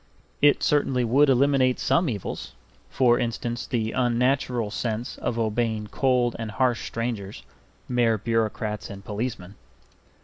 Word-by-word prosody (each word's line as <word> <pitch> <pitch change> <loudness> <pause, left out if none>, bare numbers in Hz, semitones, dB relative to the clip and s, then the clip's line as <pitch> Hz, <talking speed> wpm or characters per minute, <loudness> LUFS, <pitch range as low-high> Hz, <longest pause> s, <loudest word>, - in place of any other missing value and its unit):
It 145 0 +4
certainly 135 -4 +2
would 135 +5 +4
eliminate 130 -1 +3
some 170 -3 +2
evils; 105 -6 -5 0.4
for 120 -2 +3
instance, 120 0 -3
the 115 -4 -1
unnatural 125 -2 +1
sense 115 +1 -3
of 120 -1 -2
obeying 110 -1 -1
cold 125 -3 +1
and 115 -1 -4
harsh 120 +1 0
strangers, 115 -4 -4 0.4
mere 120 -3 +2
bureaucrats 110 -1 -2
and 100 0 -9
policemen. 105 -3 -4
120 Hz, 125 wpm, -25 LUFS, 110-125 Hz, 0.4 s, It